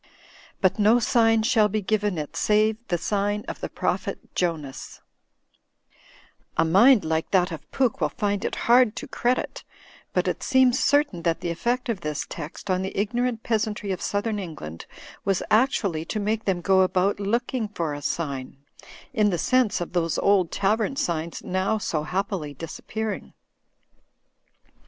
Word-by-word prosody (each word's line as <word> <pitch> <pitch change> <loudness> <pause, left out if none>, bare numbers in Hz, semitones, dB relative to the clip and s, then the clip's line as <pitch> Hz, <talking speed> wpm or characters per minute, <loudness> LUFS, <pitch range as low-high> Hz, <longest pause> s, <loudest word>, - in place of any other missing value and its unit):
But 190 +1 +2
no 215 +3 +5
sign 225 -2 +3
shall 220 -3 +3
be 215 +2 0
given 205 -2 0
it 150 -1 -5
save 215 +1 +2
the 175 - 0
sign 205 +3 -1
of - - -6
the - - -4
prophet - - -3
Jonas/ 155 -6 -3 1.6
"A - - +4
mind 210 +7 +6
like 160 0 -1
that 180 -1 +2
of 155 -2 -8
Pooke 255 -4 0
will - - +2
find 205 -1 -1
it - - -2
hard 240 -1 +5
to - - -6
credit, 245 +1 -1 0.5
but - - 0
it - - -1
seems 260 -2 +4
certain 285 - +2
that 165 -1 0
the 170 - -2
effect 240 +10 -1
of 220 -6 -2
this 150 -2 -3
text 165 +6 -6
on 185 0 +1
the 190 - -5
ignorant 240 +2 -1
peasantry 215 -3 -1
of 185 - -3
southern 205 +1 -1
England 150 - -7 0.4
was 195 -2 0
actually 210 - +2
to 215 - -3
make 215 +2 -1
them 185 -3 0
go 190 +1 +4
about 185 +2 +2
looking 230 +3 -1
for 170 -7 -3
a 145 - -6
sign, 140 -5 -3 0.6
*m 210 -1 +3
the 175 - 0
sense 235 +3 +2
of 175 - -5
those 165 -2 0
old 195 -4 +3
tavern 215 +6 +1
signs 170 - -2
now 190 +4 0
so 165 -7 -2
happily 180 -3 -3
disappearing. 210 +8 -5
200 Hz, 160 wpm, -25 LUFS, 170-220 Hz, 1.6 s, mind